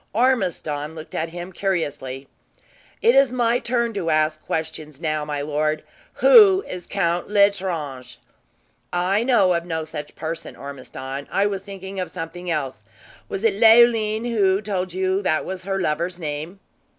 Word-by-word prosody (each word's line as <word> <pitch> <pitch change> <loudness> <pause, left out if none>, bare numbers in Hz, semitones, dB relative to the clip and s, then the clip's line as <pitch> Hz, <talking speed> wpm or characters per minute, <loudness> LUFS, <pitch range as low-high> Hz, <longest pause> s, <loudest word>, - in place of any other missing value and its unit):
Ormiston 180 - 0
looked 155 -1 -10
at 165 +1 -2
him 175 +2 -8
curiously. 145 -9 -3 0.8
"It 465 - +6
is 275 -2 +5
my 240 -1 +2
turn 235 -1 -1
to 185 -5 -2
ask 155 0 +1
questions, 155 -2 -4
now, 155 -2 -1
my 145 -1 -3
lord. 155 +1 -1 0.3
Who 420 -6 +7
is 180 -1 -7
Count 175 -3 -1
L'Estrange?" 180 - 0 0.7
"I 185 +4 +1
know 220 -8 +4
of 170 0 -1
no 160 -2 -3
such 155 -1 -8
person, 165 +1 -5
Ormiston. 135 0 -7
I 195 - +2
was 200 -2 -1
thinking 195 -1 -8
of 180 - -3
something 175 +1 -6
else! 135 -9 -3 0.5
Was 195 - -4
it 205 -3 +2
Leoline 225 -1 +5
who 200 -5 +2
told 190 -3 -3
you 190 +2 0
that 155 -5 0
was 185 -1 -6
her 195 0 -1
lover's 170 +1 -1
name?" 155 +3 -5
180 Hz, 150 wpm, -22 LUFS, 155-205 Hz, 0.8 s, Who